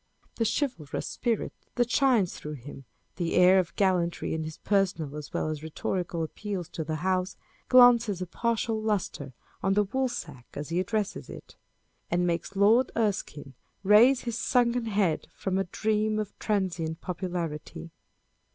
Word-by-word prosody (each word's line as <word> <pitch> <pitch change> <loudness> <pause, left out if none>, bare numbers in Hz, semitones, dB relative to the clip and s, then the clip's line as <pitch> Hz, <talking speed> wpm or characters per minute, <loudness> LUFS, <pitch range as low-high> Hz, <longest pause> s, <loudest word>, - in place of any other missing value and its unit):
The 230 - +1
chivalrous 240 - -3
spirit 235 -3 -2 0.2
that 245 -1 +1
shines 245 -10 +3
through 150 - -7
him, 135 0 -10 0.3
the 170 -2 -1
air 180 +1 +7
of 170 -2 -2
gallantry 180 -3 +1
in 160 0 -2
his 155 0 -7
personal 180 -8 0
as 150 -1 -7
well - - -1
as 155 -1 -4
rhetorical 165 +2 -3
appeals 190 +1 -5
to 160 - -4
the 155 0 -3
House, 185 0 0 0.3
glances 240 -6 +6
a 185 - -3
partial 225 +3 -1
lustre 195 -10 -2 0.3
on 195 0 +1
the 210 0 +3
Woolsack 190 - -3
as 145 +1 -5
he 170 +2 0
addresses 205 +2 -2
it; - - -11 0.5
and 175 +1 +1
makes 175 +3 -2
Lord 220 +6 +4
Erskine 190 - -2 0.3
raise 230 +6 +6
his 235 -1 -3
sunken 245 -1 +2
head 200 -7 0
from 190 -1 -1
a 195 - 0
dream 215 +3 0
of 210 -1 -3
transient 180 -6 -1
popularity. 165 - -5
190 Hz, 150 wpm, -28 LUFS, 165-220 Hz, 0.5 s, air